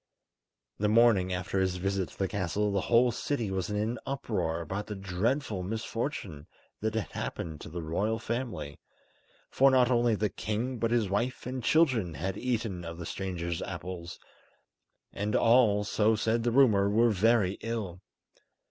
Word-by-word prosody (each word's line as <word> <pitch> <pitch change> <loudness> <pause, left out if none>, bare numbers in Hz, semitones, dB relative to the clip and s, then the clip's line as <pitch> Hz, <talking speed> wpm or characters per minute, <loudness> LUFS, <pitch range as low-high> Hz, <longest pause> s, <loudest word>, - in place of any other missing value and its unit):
The 105 0 +2
morning 110 -5 +4
after 90 +1 -2
his 95 -1 +1
visit 95 0 -1
to - - -17
the 95 - 0
castle 100 +2 -1
the 100 -1 +1
whole 120 +3 +4
city 115 -3 -2
was 95 0 -2
in 105 - -2
an 110 +3 -1
uproar 100 -12 -2
about 95 +6 -4
the 105 - -5
dreadful 95 +4 -1
misfortune 110 - -4 0.3
that 110 +1 -2
had 110 - -2
happened 80 -3 -5
to - - -8
the 85 +1 -5
Royal 100 +8 0
Family, 110 - -4 0.7
for 135 +1 +5
not 130 -1 +4
only 120 -2 +3
the 105 +1 0
king 115 +6 -3
but 115 - +1
his 115 -3 +2
wife 120 +7 -2
and 130 0 -4
children, 120 - +2
had 95 +7 -3
eaten 110 -6 -2
of 85 0 -7
the 85 - -6
stranger's 85 -2 -3
apples, 90 -2 -6 1.0
and 105 +1 -2
all, 115 -3 +4
so 110 +2 +2
said 115 +2 +1
the 120 +1 0
rumour, 110 -6 +5
were 115 +3 +4
very 105 -1 +2
ill. 105 -6 -4
105 Hz, 165 wpm, -29 LUFS, 95-115 Hz, 1.0 s, for